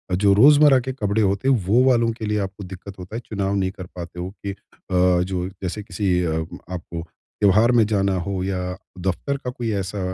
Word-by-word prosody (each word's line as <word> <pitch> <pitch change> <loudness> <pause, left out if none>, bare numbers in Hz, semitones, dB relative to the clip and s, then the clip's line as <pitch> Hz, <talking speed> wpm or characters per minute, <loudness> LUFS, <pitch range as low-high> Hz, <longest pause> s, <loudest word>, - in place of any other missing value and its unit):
जो 100 +1 +4
रोज़मर्रा 145 +5 +7
के 130 +1 -4
कपड़े 105 -3 0
होते 100 +4 +1
हैं 135 - +5
वो 115 +7 +4
वालों 115 -2 +3
के 110 -1 -6
लिए 105 0 0
आपको 100 0 -5
दिक्कत 95 +1 -9
होता 90 +4 -8
है - - -2
चुनाव 100 -2 -2
नहीं 95 -1 0
कर 95 -1 -9
पाते 90 0 -7
हो 90 +1 -4 0.2
कि 100 - -1
अ, - - -8 0.7
जो 90 -1 -3
जैसे 95 +2 -6
किसी 95 -3 0
अ, 80 - 0 0.4
आपको 85 -2 -5
त्योहार 105 +6 +1
में 120 -3 +5
जाना 100 -2 +1
हो 95 -2 -2
या 95 -1 -2 0.4
दफ़्तर 95 +10 -2
का 125 - -5
कोई 120 -2 -3
ऐसा 95 +2 -5
100 Hz, 205 wpm, -22 LUFS, 95-110 Hz, 0.7 s, रोज़मर्रा